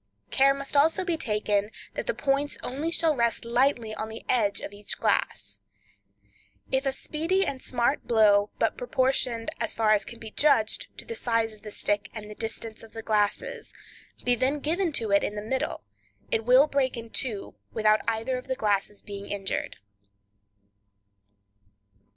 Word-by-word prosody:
Care 275 0 +5
must 275 +1 -5
also 320 +6 +4
be 345 -2 +1
taken 210 -6 0 0.2
that - - -4
the - - 0
points 280 +1 0
only 285 +6 -2
shall 330 -2 +2
rest 235 -2 0
lightly 235 -2 +1
on 215 0 -4
the 220 - -9
edge 215 -5 +3
of 200 - -7
each 205 0 -4
glass. - - 0 1.1
If 265 +1 +1
a - - +3
speedy 330 +8 0
and 265 -5 -3
smart 250 +3 0
blow, 210 -3 +5
but - - 0
proportioned, 255 - +1
as - - -1
far 220 -1 +3
as 210 -1 +4
can 235 - -9
be 220 -1 -9
judged, 285 - +2
to - - -7
the 465 - -5
size 230 - 0
of 215 - -17
the 215 - -8
stick 205 -1 -1
and 210 -1 -7
the - - -6
distance 225 0 -4
of 225 - -14
the 225 - -6
glasses, 210 -2 0 0.5
be 245 - +4
then 260 +4 +1
given 335 +5 0
to 225 -6 0
it 200 - +4
in 205 - -2
the - - -3
middle, 225 - -2 0.5
it 225 0 +1
will 255 +4 +7
break 275 -4 0
in 230 -1 -8
two 225 -7 -2 0.2
without 215 -1 +3
either 230 +3 0
of 250 - -13
the 260 - -1
glasses 205 -2 0
being 200 -1 -7
injured. 195 -1 -3
230 Hz, 175 wpm, -27 LUFS, 215-275 Hz, 1.1 s, will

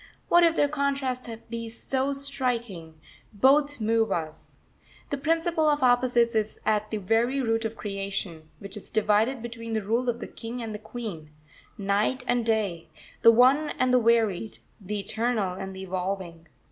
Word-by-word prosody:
What 345 0 +6
if 335 -1 +4
their 290 - +3
contrast 275 -4 -2 0.2
be 230 -1 -4
so 265 +4 -2
striking 240 - -3 0.3
both 280 +5 +3
move 225 0 +1
us. 160 -1 -5 0.5
This 285 - -2
principle 325 +1 +1
of 295 -2 +1
opposites 245 -1 +3
is 220 -1 -1
at 215 0 +1
the 215 - -2
very 225 +7 +1
root 225 -3 0
of 220 0 -3
creation, 195 -5 -4
which 200 +1 -9
is 210 - -10
divided 220 +3 +1
between 230 -1 -6
the 220 -1 -1
rule 235 +5 0
of 235 0 -2
the - - -5
King 235 +2 -7
and 225 -2 -5
the 210 - -6
Queen; 215 -8 -7 0.5
Night 205 +6 0
and 245 -1 +1
Day; 210 -7 -1 0.3
the 230 - +8
One 260 +6 +5
and 255 0 +2
the 250 - +6
Varied; 225 -3 +1 0.3
the 205 +2 -3
Eternal 215 -1 -1
and 190 +1 -6
the 190 - -7
Evolving. 180 -3 -4
225 Hz, 165 wpm, -26 LUFS, 200-255 Hz, 0.5 s, the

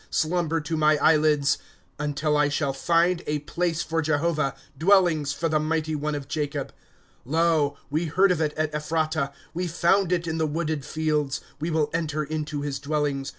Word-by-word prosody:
Slumber 165 0 0
to 155 +2 -3
my 155 -1 +4
eyelids; 150 -1 +3
^ - - -22 0.4
Until 150 +1 0
I 150 0 +3
shall 145 -1 0
find 170 +5 +2
a 150 - 0
place 165 +3 -2
for 165 +1 -1
Jehovah, 155 -1 0 0.2
Dwellings 165 -3 +3
for 165 - -1
the 155 -1 +1
mighty 155 0 -1
one 150 0 -2
of 140 -2 -6
Jacob. 145 -1 -3 0.3
* - - -35
Lo, 155 0 +1
we 155 +4 0
heard 185 +5 +3
of 170 -3 0
it 155 -1 +1
at 155 -1 -1
Ephratah; 155 -1 -1 0.2
We 180 +2 -2
found 175 +3 +2
it 175 -1 +1
in 160 -1 -2
the 160 - +1
wooded 155 -2 -2
fields. 150 -2 -1
' - - -30
We 160 - -1
will 155 -2 0
enter 155 -2 -1
in 155 +1 -3
to 145 -1 -4
his 140 -2 -3
dwellings. 145 -1 -1
155 Hz, 195 wpm, -25 LUFS, 150-165 Hz, 0.4 s, my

